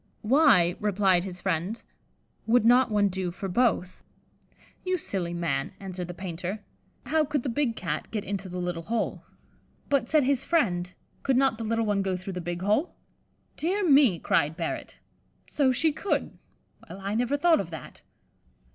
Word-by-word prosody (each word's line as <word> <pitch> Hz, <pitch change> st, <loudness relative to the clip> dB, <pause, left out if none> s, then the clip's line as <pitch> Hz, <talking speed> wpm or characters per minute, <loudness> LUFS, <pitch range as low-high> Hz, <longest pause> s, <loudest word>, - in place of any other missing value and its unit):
"Why," 215 Hz, -, +4 dB
replied 195 Hz, -3 st, +2 dB
his 180 Hz, -2 st, -7 dB
friend, 185 Hz, +4 st, -1 dB, 0.7 s
"would 230 Hz, 0 st, +4 dB
not 245 Hz, +2 st, +5 dB
one 205 Hz, -1 st, +3 dB
do 190 Hz, -1 st, -2 dB
for 195 Hz, +3 st, -6 dB
both?" 185 Hz, -3 st, 0 dB, 0.8 s
"You 370 Hz, 0 st, 0 dB
silly 185 Hz, -, -3 dB
man," 145 Hz, -5 st, -2 dB
answered 185 Hz, -2 st, -6 dB
the 175 Hz, -, -7 dB
painter, 185 Hz, +3 st, -5 dB, 0.4 s
"how 310 Hz, +5 st, +2 dB
could 295 Hz, -3 st, -2 dB
the 265 Hz, -, -2 dB
big 240 Hz, -1 st, 0 dB
Cat 155 Hz, -4 st, -4 dB
get 210 Hz, -3 st, -3 dB
into 195 Hz, -1 st, -4 dB
the 180 Hz, -, -6 dB
little 175 Hz, -1 st, -3 dB
hole?" 225 Hz, +6 st, -2 dB, 0.7 s
"But," 275 Hz, -4 st, +1 dB
said 305 Hz, -2 st, +4 dB
his 270 Hz, 0 st, +1 dB
friend, 180 Hz, -, +1 dB, 0.3 s
"could 265 Hz, -2 st, +1 dB
not 265 Hz, -4 st, +2 dB
the -, -, -3 dB
little 225 Hz, +1 st, 0 dB
one 205 Hz, -2 st, +1 dB
go 190 Hz, -1 st, -1 dB
through 190 Hz, +1 st, -7 dB
the 180 Hz, -, -4 dB
big 175 Hz, +1 st, -4 dB
hole?" 215 Hz, -, +1 dB, 0.6 s
"Dear 370 Hz, +4 st, 0 dB
me," 275 Hz, -, +5 dB
cried 160 Hz, -1 st, +1 dB
Barrett, 165 Hz, -2 st, -4 dB, 0.5 s
"so 275 Hz, -3 st, +2 dB
she 315 Hz, +5 st, +2 dB
could; 390 Hz, +7 st, -2 dB, 0.5 s
well, -, -, -8 dB
I 200 Hz, +1 st, -3 dB
never 245 Hz, +5 st, +1 dB
thought 330 Hz, +1 st, +4 dB
of 180 Hz, -, -8 dB
that." 160 Hz, -5 st, -10 dB
205 Hz, 170 wpm, -27 LUFS, 180-260 Hz, 0.8 s, not